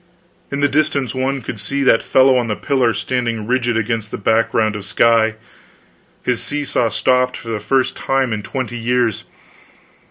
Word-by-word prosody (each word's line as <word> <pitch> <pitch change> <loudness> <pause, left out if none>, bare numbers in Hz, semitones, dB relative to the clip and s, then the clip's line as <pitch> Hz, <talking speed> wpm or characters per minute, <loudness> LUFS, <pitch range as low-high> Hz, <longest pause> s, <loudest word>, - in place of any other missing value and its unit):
In 140 0 -2
the 145 - +4
distance 145 -3 0
one 130 0 -2
could 110 - -6
see 140 +8 -2
that 115 - +4
fellow 130 0 +4
on 120 -2 +1
the 105 - -1
pillar 130 -3 +1
standing 115 0 -2
rigid 120 -1 0
against 115 -1 -2
the - - -5
background 110 0 +1
of 105 - -6
sky, 110 +2 +3 0.9
his 125 -2 -1
seesaw 145 -5 -1
stopped 125 +2 +1
for 115 - -9
the 110 -2 -2
first 130 +6 0
time 135 -3 0
in 105 - -3
twenty 120 +1 -4
years. 120 -1 0
120 Hz, 165 wpm, -18 LUFS, 110-130 Hz, 0.9 s, the